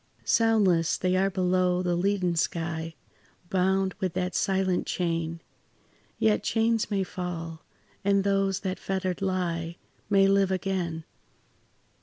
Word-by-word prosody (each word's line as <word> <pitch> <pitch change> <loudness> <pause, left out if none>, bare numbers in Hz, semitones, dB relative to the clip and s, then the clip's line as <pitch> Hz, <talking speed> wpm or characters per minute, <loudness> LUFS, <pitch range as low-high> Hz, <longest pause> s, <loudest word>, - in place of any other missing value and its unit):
Soundless 200 -8 +3
they 185 0 +1
are 190 +1 +3
below 180 -1 +1
the 175 -1 +1
leaden 185 -1 +1
sky, 165 0 -2 0.6
Bound 190 0 +2
with 185 -3 -1
that 180 -1 -1
silent 190 -1 0
chain; 165 -1 -2 0.8
Yet 105 -1 +2
chains 225 0 +1
may 200 -2 0
fall, 170 -3 -6 0.4
and 200 0 +3
those 195 -1 +1
that 190 -2 -3
fettered 190 -1 -2
lie 175 -3 -2 0.3
May 195 -1 +5
live 195 -1 +3
again. 185 -4 -2
185 Hz, 120 wpm, -27 LUFS, 170-195 Hz, 0.8 s, May